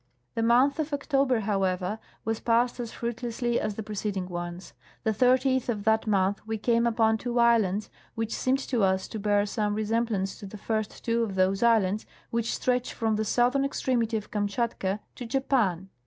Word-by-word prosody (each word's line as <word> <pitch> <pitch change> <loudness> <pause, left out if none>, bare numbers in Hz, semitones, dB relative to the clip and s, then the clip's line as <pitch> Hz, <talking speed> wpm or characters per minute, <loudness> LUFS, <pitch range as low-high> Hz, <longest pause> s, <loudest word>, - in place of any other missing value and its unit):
The 230 - -1
month 250 +6 +4
of 305 -1 -2
October, 275 -4 +1
however, 195 0 -1 0.3
was 225 0 -1
passed 240 +1 +1
as 235 -2 -4
fruit 235 -1 -4
lessly 240 0 -1
as 210 -1 -2
the 220 - -5
preceding 205 -3 -3
ones. 175 0 -6 0.3
The 220 - +2
30th 255 +3 +2
of 210 -4 -1
that 220 +1 +2
month 200 -1 +1
we 220 0 -2
came 235 +2 +2
upon 225 -1 +2
two 245 +1 -3
islands, 220 -4 +3 0.2
which 225 0 -2
seemed 260 +1 +1
to 245 -4 +1
us 190 -1 +2
to 220 - -5
bear 205 0 +2
some 210 0 -1
resemblance 215 -2 -1
to 200 - -8
the 210 - -9
first 215 +1 -3
two 230 0 +1
of 210 -4 -2
those 190 +1 +2
islands 215 -3 +3 0.2
which 230 0 0
stretch 250 -1 -1
from 220 -2 0
the' 215 - 0
southern 245 +5 +2
extremity 240 -5 0
of 210 - -8
Kamshatka 205 -1 -1
to 245 - -7
Japan. 225 -8 0
220 Hz, 185 wpm, -27 LUFS, 205-240 Hz, 0.3 s, month